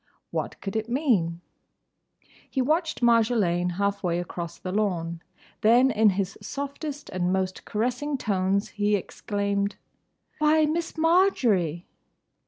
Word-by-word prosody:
What - - -3
could 195 0 -5
it 220 +1 -2
mean? 210 - +1 1.1
He 270 - -2
watched 315 +2 0
Marjolaine 215 -7 +3
half 200 +2 -1
way 175 -2 0
across 175 -1 -5
the 185 - -5
lawn. 170 -5 -1 0.4
Then 245 +5 +5
in 215 0 +4
his 195 0 -2
softest 285 +1 -5
and 180 0 0
most 185 0 -2
caressing 250 +6 -1
tones 200 -3 0
he 210 -1 +1
exclaimed, 200 +1 -2 0.6
"Why, 305 +1 +4
Miss 325 +2 -2
Marjory—!" 245 - +2
210 Hz, 120 wpm, -26 LUFS, 185-270 Hz, 1.1 s, Then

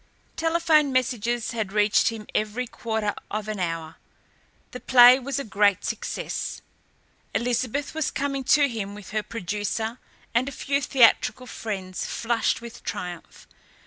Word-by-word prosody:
Telephone 325 -3 +3
messages 240 -2 0
had 220 -4 -3
reached 210 0 +3
him 225 -2 -3
every 215 +4 -1
quarter 220 -3 -2 0.2
of 215 0 -3
an 215 -2 -4
hour. 165 -2 -3 0.7
The 250 - -7
play 250 0 +8
was 275 +2 -3
a 280 - -2
great 205 -2 +2
success. - - -4 0.7
Elizabeth 250 +3 -1
was 315 -2 -1
coming 275 -1 -2
to 290 +2 +5
him 205 -5 -5
with 205 -2 -11
her 215 0 0
producer 210 +3 -3 0.3
and 250 +3 +2
a - - -9
few 280 +1 -1
theatrical 250 -2 +3
friends, 195 -6 -5
flushed 230 0 0
with 235 0 -10
triumph. 175 -1 -6
230 Hz, 140 wpm, -25 LUFS, 210-255 Hz, 0.7 s, play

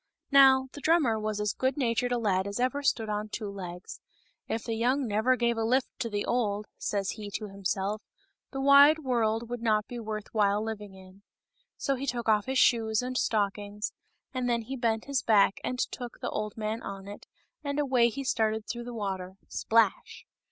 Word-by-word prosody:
Now, 265 -1 +7
the 290 - -10
drummer 290 -10 +3
was 215 -1 -2
as 210 -1 0
good 260 +1 -1
natured 245 -2 0
a 245 - +2
lad 195 -4 +1
as 200 +3 -4
ever 255 +3 0
stood 230 -5 +1
on 210 0 -3
two 210 -1 -5
legs. 180 -2 -8 0.2
" - - -38
If 225 - -2
the 230 - -3
young 250 +5 +1
never 220 +5 +2
gave 235 -1 +1
a - - 0
lift 250 +3 +2
to 235 -3 -2
the 205 -1 -2
old," 210 -4 0
says 200 -1 -1
he 210 -2 -7
to 215 -1 -4
himself, 195 +2 -2 0.5
the 270 - -4
wide 280 +3 +7
world 230 -3 0
would 240 0 -5
not 215 -2 +2
be 245 - -6
worth 215 -1 -6
while 205 -2 +3
living 210 -3 -6
in." 190 +1 -15 0.6
So 275 - 0
he 270 +1 -4
took 240 -2 -2
off 210 0 +3
his 265 0 0
shoes 225 -2 +3
and 255 0 -4
stockings, 205 -2 -1 0.4
and 255 -1 -1
then 235 -1 +1
he 265 +4 -5
bent 230 -3 0
his 280 -2 0
back 205 -3 +4
and 250 - -2
took 245 -1 -4
the - - -3
old 210 0 -4
man 220 +1 -3
on 195 0 -7
it, 205 - -10 0.4
and 285 -1 -3
away 255 -5 +3
he 275 +4 -5
started 220 -4 0
through 240 -1 -5
the 240 -1 -7
water 190 -3 -4
— - - -39
splash 225 -3 +1
225 Hz, 205 wpm, -29 LUFS, 210-250 Hz, 0.6 s, Now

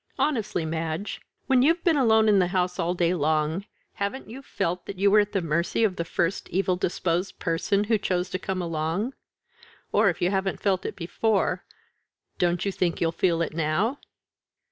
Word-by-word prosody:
Honestly, 220 - 0
Madge, 160 +4 -3 0.2
when 265 -3 +4
you've 330 +5 +3
been 335 -3 +4
alone 220 -5 +4
in 205 -2 +5
the 180 - +3
house 180 0 -1
all 175 +1 0
day 175 0 +2
long, 155 +3 0 0.3
haven't 200 +7 -4
you 245 +5 -9
felt 180 -9 -3
that 195 - -6
you 200 +1 +3
were 210 - +7
at 205 0 +1
the 195 -4 -1
mercy 170 +7 0
of 200 -4 +2
the 170 - -1
first 170 +2 -1
evil 185 0 +1
disposed 180 +1 -1
person 175 +4 0
who 215 0 +1
chose 180 -2 -1
to 185 - -2
come 185 -1 -3
along; 165 - -2 0.8
or, 210 0 +4
if 175 - -3
you 175 +1 +1
haven't 195 -1 -1
felt 190 -3 0
it - - -6
before, 185 +1 0 0.8
don't 175 +1 +1
you 200 - 0
think 180 -2 -1
you'll 165 -1 +1
feel 170 -1 +1
it 165 - -4
now?" 165 - 0
185 Hz, 190 wpm, -26 LUFS, 170-210 Hz, 0.8 s, were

